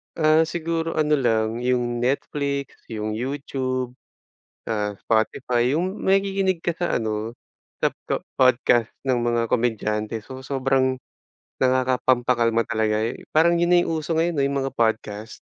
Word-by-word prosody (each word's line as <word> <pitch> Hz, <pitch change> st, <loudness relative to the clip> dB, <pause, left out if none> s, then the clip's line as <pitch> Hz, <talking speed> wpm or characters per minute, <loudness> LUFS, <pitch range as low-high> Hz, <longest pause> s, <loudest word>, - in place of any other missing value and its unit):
Ah, 155 Hz, 0 st, +4 dB
siguro 165 Hz, 0 st, -2 dB
ano 155 Hz, -1 st, +1 dB
lang 115 Hz, -2 st, +1 dB
yung 120 Hz, -1 st, 0 dB
Netflix, 140 Hz, +2 st, -2 dB
yung 110 Hz, -1 st, -4 dB
YouTube, 130 Hz, +1 st, -3 dB, 0.8 s
ah, 105 Hz, -2 st, -1 dB
Spotify, 120 Hz, +2 st, +1 dB
yung 180 Hz, +6 st, 0 dB
makikinig 195 Hz, -1 st, +2 dB
ka 170 Hz, 0 st, -2 dB
sa 175 Hz, 0 st, 0 dB
ano 110 Hz, 0 st, -2 dB, 0.5 s
sap -, -, +1 dB
po -, -, -1 dB, 0.2 s
podcast 120 Hz, -2 st, +3 dB, 0.2 s
ng 130 Hz, -, +3 dB
mga 120 Hz, 0 st, +1 dB
komedyante. 110 Hz, -2 st, -1 dB
So 130 Hz, +4 st, -10 dB
sobrang 130 Hz, -1 st, +1 dB, 0.6 s
nakakapampakalma 125 Hz, -3 st, +2 dB
talaga 110 Hz, 0 st, 0 dB
eh. 115 Hz, -, -5 dB
Parang 165 Hz, +2 st, +4 dB
yun 175 Hz, -, +2 dB
na 180 Hz, -, +6 dB
yung 160 Hz, -1 st, -1 dB
uso 160 Hz, +1 st, -2 dB
ngayon 165 Hz, -3 st, +1 dB
eh, -, -, +3 dB
yung 140 Hz, -, -1 dB
mga 135 Hz, -, -4 dB
podcast. 110 Hz, -1 st, -1 dB
130 Hz, 140 wpm, -23 LUFS, 115-155 Hz, 0.8 s, na